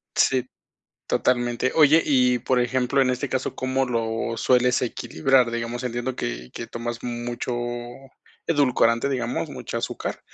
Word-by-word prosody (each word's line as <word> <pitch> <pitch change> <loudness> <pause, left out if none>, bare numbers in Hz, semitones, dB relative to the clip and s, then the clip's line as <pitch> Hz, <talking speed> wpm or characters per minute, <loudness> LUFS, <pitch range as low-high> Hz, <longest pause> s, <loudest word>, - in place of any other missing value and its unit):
Sí, 130 -2 +3 0.6
totalmente, 120 0 +1
oye 155 +1 +6
y, 125 -3 +3
por 130 +1 +1
ejemplo, 130 +2 +1
en 130 -1 +3
este 125 +2 -2
caso, 130 0 -2
¿cómo 130 +1 0
lo 115 -1 -2
sueles 125 -1 +3
equilibrar? 130 0 +1
Digamos, 120 +1 -3
entiendo 120 +1 -3
que - - -4
que - - -6
tomas 115 0 -5
mucho 120 +1 -4 1.0
edulcorante, 130 -5 +3
digamos, 125 -3 -2
mucha - - -5
azúcar, - - -4
125 Hz, 135 wpm, -24 LUFS, 120-130 Hz, 1.0 s, oye